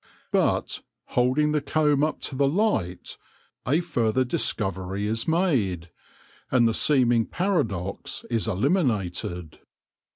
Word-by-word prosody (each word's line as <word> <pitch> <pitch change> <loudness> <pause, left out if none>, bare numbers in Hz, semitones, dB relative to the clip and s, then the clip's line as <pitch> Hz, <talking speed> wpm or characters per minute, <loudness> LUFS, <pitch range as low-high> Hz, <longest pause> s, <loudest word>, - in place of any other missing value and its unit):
But, - - +1 0.3
holding 130 +5 +2
the 150 -1 +1
comb 145 0 +2
up 155 - -1
to 135 - -4
the 140 +1 +2
light, 140 - -1 0.5
a 150 +6 +3
further 130 -7 0
discovery 100 - -2
is 115 +2 -1
made, 115 - 0 0.6
and 120 -3 +4
the 115 - +1
seeming 120 -4 +3
paradox 115 - -2
is 115 -2 +1
eliminated. 95 - -1
125 Hz, 110 wpm, -25 LUFS, 100-150 Hz, 0.6 s, and